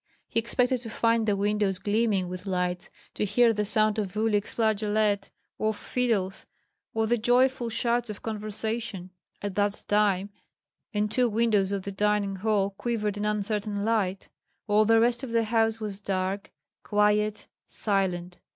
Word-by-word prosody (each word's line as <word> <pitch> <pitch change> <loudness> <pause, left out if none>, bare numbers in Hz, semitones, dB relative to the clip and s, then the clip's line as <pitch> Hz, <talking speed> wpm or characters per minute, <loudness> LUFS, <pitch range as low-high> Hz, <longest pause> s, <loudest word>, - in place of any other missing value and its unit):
He - - 0
expected 245 +2 +1
to 230 - -7
find 230 0 +1
the 205 - +3
windows 205 -1 0
gleaming 205 -2 +1
with 185 +2 -7
lights, 180 -1 -2 0.2
to - - -2
hear 225 +3 +4
the 210 -1 0
sound 215 +1 +2
of 200 -2 -3
Uhlik's 210 -2 +1
flageolet, 215 -2 +1 0.3
of 215 -1 0
fiddles, 215 -7 -1 0.5
or 225 0 +2
the 235 +1 +1
joyful 245 +1 +3
shouts 235 +1 0
of 210 - -7
conversation. 215 -3 -3 0.3
At 205 -1 -3
that 205 +1 +1
time 205 -1 +2 0.6
in 210 -1 0
two 245 +3 +1
windows 215 -3 +2
of 200 -2 -2
the 200 - -4
dining 205 -1 0
hall 200 -1 +1
quivered 210 0 -2
an 205 - -2
uncertain 210 0 -1
light; 200 -4 0 0.4
all 210 0 +3
the 225 +1 +5
rest 235 +1 +3
of 265 - -5
the 230 0 +2
house 225 0 +1
was 205 -3 -4
dark, 195 0 -2 0.3
quiet, 210 0 +1 0.2
silent. 180 -4 -1
210 Hz, 155 wpm, -27 LUFS, 200-225 Hz, 0.6 s, the